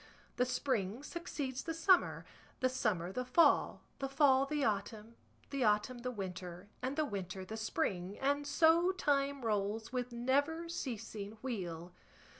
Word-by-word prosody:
The 250 - +2
spring 245 -3 -1
succeeds 290 -6 -4
the 325 -1 -4
summer, 360 +3 +3 0.3
the 255 - +2
summer 195 -9 0
the 250 +6 -2
fall, 330 +7 +4 0.2
the 270 - -2
fall 275 -1 +4
the 295 0 -1
autumn, 215 +2 -2 0.4
the 275 -2 0
autumn 215 +3 +2
the 250 +1 -3
winter, 185 -4 -6
and 260 +2 -2
the 310 0 +1
winter 190 -5 -5
the 220 - -6
spring, 195 -3 -2
and 285 +1 0
so 335 +5 +4
time 280 -6 0
rolls 215 +2 -1
with 250 -1 -2
never 285 +8 +1
ceasing 225 -8 -5
wheel. 175 -8 -4
250 Hz, 145 wpm, -35 LUFS, 205-280 Hz, 0.4 s, fall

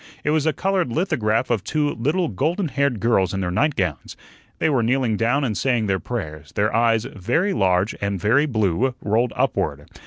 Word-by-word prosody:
It 150 - +1
was 155 0 +1
a - - +4
colored 185 -6 -1
lithograph 120 - 0
of 110 -5 0
two 150 +4 0
little 155 +9 0
golden 160 - -1
haired 140 -3 0
girls 100 -5 +1
in 95 - -2
their 90 -2 -2
nightgowns. 95 - -1 0.4
They - - +1
were 135 -6 +2
kneeling 120 -1 +1
down 120 +6 +1
and 115 -5 -1
saying 120 -3 +1
their 95 -2 0
prayers; 80 -8 -6
their 105 +1 0
eyes 115 -1 +2
very 130 - -1
large 95 0 +1
and 100 -1 -1
very 130 - +3
blue 115 - 0
rolled 110 +4 +1
upward. - - -1
115 Hz, 185 wpm, -22 LUFS, 100-145 Hz, 0.4 s, a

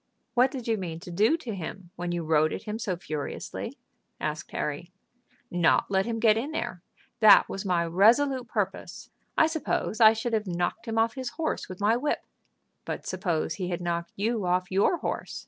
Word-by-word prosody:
"What 250 +1 +4
did 255 -3 -7
you 225 -1 +1
mean 170 -4 -5
to 175 - -9
do 215 - +3
to 250 -9 -6
him 185 0 -7
when 175 0 -3
you 175 -1 -2
rode 155 0 +2
at - - -5
him 215 0 -4
so 200 -7 -2
furiously?" 155 -4 -5 0.4
asked 155 0 -3
Harry. 150 +4 -4 0.6
"Not 175 +2 +2
let 190 +2 +2
him 230 -1 -1
get 220 -1 +5
in 255 +6 -2
there. 185 - -4 0.4
That 215 -3 +8
was 195 - -5
my 175 -3 +1
resolute 240 +9 +3
purpose. - - -4 0.3
I - - +6
suppose 315 -7 -1
I 220 0 +9
should 225 +1 -3
have 215 -2 0
knocked 180 +6 -2
him 225 0 -2
off 225 0 +3
his 260 -2 -4
horse 320 -1 -3
with 185 - -8
my 215 +3 +3
whip." 290 +4 -1 0.6
"But - - -5
suppose 165 -4 -1
he 185 -3 -4
had 175 - -2
knocked 170 -1 -3
you 215 -1 -1
off 180 +1 0
your 200 - +3
horse?" - - -4
200 Hz, 195 wpm, -27 LUFS, 175-230 Hz, 0.6 s, I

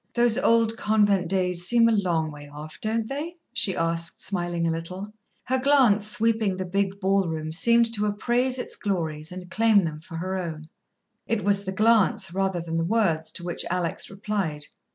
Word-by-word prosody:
"Those 240 -2 +4
old 230 -1 +3
convent 205 -4 +2
days 180 -2 0
seem 235 0 +5
a - - +3
long 175 -7 0
way 145 -1 -11
off, 150 +2 -10
don't 220 +1 -1
they?" 300 +7 -5 0.2
she 195 -7 0
asked, 165 0 -1
smiling 175 -3 -1
a 165 - +1
little. 185 +5 -6 0.3
Her 260 +1 0
glance, 255 -7 +4
sweeping 220 -3 +1
the 185 - -3
big 195 +2 -1
ballroom, 180 -5 0
seemed 235 +6 +3
to 210 -1 +1
appraise 240 +5 0
its 250 - -5
glories 160 -6 -3
and 180 0 -9
claim 220 -2 +4
them 155 -2 -4
for 165 +1 -10
her 185 +3 -3
own. 160 -3 -6 0.6
It 225 -3 0
was 200 0 +1
the 190 - -2
glance, 210 -4 +2
rather 190 -1 0
than 165 0 -3
the 165 - +1
words, 170 -5 +1
to 175 - -4
which 175 0 -2
Alex 175 -2 -2
replied. 195 -7 -3
195 Hz, 180 wpm, -25 LUFS, 170-220 Hz, 0.6 s, seem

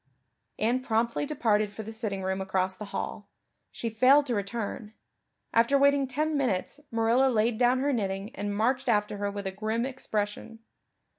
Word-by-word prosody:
Anne 240 +4 +1
promptly 235 +3 0
departed 215 -8 +1
for 220 +2 -7
the 220 - -7
sitting 215 -4 -3
room 190 0 -1
across 190 0 0
the 210 - -7
hall; 200 - -5 0.4
she 235 - -5
failed 255 +6 +5
to 250 - -2
return; 210 +1 -4 0.6
after 235 +5 +4
waiting 280 0 +4
ten 305 +4 -1
minutes 260 -2 -1
Marilla 230 +4 +3
laid 225 -1 +1
down 245 +1 +4
her 285 +1 +1
knitting 200 +1 -3
and 205 -3 -3
marched 250 +4 +1
after 210 -2 +1
her 205 0 -1
with 200 0 -6
a 190 - -2
grim 220 +4 -2
expression. 225 -4 -3
225 Hz, 165 wpm, -28 LUFS, 205-255 Hz, 0.6 s, failed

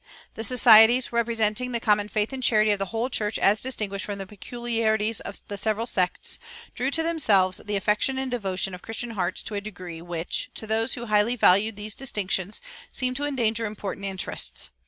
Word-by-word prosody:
"[406:3] - - -42
The 225 - -6
societies, 235 0 +6
representing 235 +1 0
the 235 - 0
common 210 -3 +2
faith 215 +4 -1
and 265 - -5
charity 215 -3 +4
of 205 - 0
the 195 - -2
whole 230 +4 -2
church 220 -4 -1
as 205 +2 +3
distinguished 210 -6 -3
from 205 -1 -4
the 195 - -6
peculiarities 220 +1 -2
of 200 - -5
the 205 -1 -4
several 220 +2 0
sects, 185 -6 0 0.3
drew 255 +2 -1
to 325 +3 +2
themselves 210 - +2
the 210 0 -3
affection 210 +6 +1
and 265 -1 -3
devotion 195 -5 -2
of 180 - -8
Christian 230 +1 -4
hearts 185 -5 -2
to - - -5
a 200 - -2
degree 180 -5 -9
which, 170 -1 -4
to - - -6
those 220 +3 0
who 240 - -6
highly 215 +2 +2
valued 205 0 +4
these 210 +1 -5
distinctions, 200 -6 -2 0.3
seemed 255 0 0
to 290 - -2
endanger 230 -5 0
important 200 -1 -6
interests. 190 - -3
215 Hz, 195 wpm, -25 LUFS, 200-235 Hz, 0.3 s, societies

